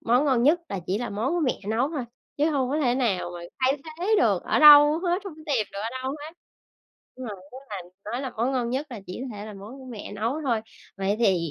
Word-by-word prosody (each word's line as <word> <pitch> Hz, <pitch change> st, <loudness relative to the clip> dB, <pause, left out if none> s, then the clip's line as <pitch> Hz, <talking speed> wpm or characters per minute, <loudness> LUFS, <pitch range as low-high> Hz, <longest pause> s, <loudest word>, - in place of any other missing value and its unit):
món 245 Hz, +5 st, +3 dB
ngon 255 Hz, -4 st, +3 dB
nhất 320 Hz, +6 st, +4 dB
là 195 Hz, -, -3 dB
chỉ 195 Hz, +3 st, 0 dB
là 245 Hz, -, -4 dB
món 225 Hz, +9 st, -1 dB
của 350 Hz, -, 0 dB
mẹ 265 Hz, -5 st, 0 dB
nấu 240 Hz, +6 st, +1 dB
thôi 290 Hz, -6 st, -3 dB, 0.3 s
chứ 300 Hz, +3 st, +2 dB
hông 280 Hz, +1 st, 0 dB
thể 245 Hz, -1 st, +2 dB
nào 200 Hz, -9 st, 0 dB, 0.3 s
thay 265 Hz, +2 st, +2 dB, 0.2 s
thế 420 Hz, +5 st, +2 dB
được -, -, +2 dB
ở -, -, +1 dB
đâu 295 Hz, +1 st, +9 dB
hết, 360 Hz, +2 st, 0 dB
hông 370 Hz, -6 st, -7 dB
có 310 Hz, -, -13 dB
tìm 240 Hz, -8 st, +1 dB
được 200 Hz, -, -6 dB
ở 225 Hz, -, -2 dB
đâu 260 Hz, -, -2 dB
hết. 300 Hz, +2 st, -7 dB, 0.8 s
Nhưng 255 Hz, -1 st, -7 dB
mà 215 Hz, -, -4 dB
nếu 190 Hz, -, -18 dB, 0.4 s
mà 200 Hz, +2 st, -10 dB
nói 245 Hz, -, -2 dB
là 265 Hz, -, -3 dB
món 240 Hz, +5 st, 0 dB
ngon 240 Hz, -2 st, -1 dB
nhất 270 Hz, +4 st, -2 dB
là 225 Hz, -4 st, -7 dB
chỉ 185 Hz, +6 st, -6 dB
có 250 Hz, -5 st, -6 dB
thể 205 Hz, +1 st, -7 dB
là 215 Hz, -, -8 dB
món 210 Hz, +7 st, -10 dB
của 260 Hz, -, -11 dB
mẹ 225 Hz, -5 st, -8 dB
nấu 230 Hz, +9 st, -2 dB
thôi. 240 Hz, -6 st, +1 dB, 0.4 s
Vậy 195 Hz, +1 st, 0 dB
thì, 180 Hz, -7 st, +2 dB
255 Hz, 255 wpm, -26 LUFS, 215-295 Hz, 0.8 s, đâu